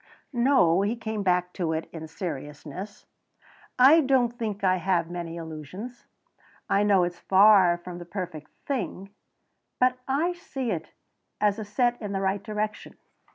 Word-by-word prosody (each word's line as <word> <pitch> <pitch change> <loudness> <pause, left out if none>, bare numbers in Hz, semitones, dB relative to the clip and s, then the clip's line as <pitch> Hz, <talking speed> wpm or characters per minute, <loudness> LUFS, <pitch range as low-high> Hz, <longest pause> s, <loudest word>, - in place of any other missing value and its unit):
"No," 235 -9 +4
he 205 +4 0
came 220 -2 -4
back 180 -2 +1
to 165 -3 -1
it 160 0 -3
in 160 -1 -7
seriousness, 160 +3 -7 0.7
"I 275 +6 +7
don't 255 -3 +2
think 215 -3 -4
I 185 -1 +3
have 175 -2 0
many 170 -1 -5
illusions. 165 - -8 0.6
I 200 - +2
know 200 -3 +4
it's 175 0 -3
far 190 -3 +6
from 175 0 -9
the 175 - -8
perfect 175 -4 -6 0.2
thing, 195 -7 -4 0.7
but 255 0 +3
I 310 +7 +1
see 270 -8 -4
it 160 -4 -3 0.5
as 210 0 0
set 240 +3 +1
in 205 -2 -4
the 195 - -1
right 195 +1 0
direction. 215 +1 -4
195 Hz, 150 wpm, -26 LUFS, 175-230 Hz, 0.7 s, I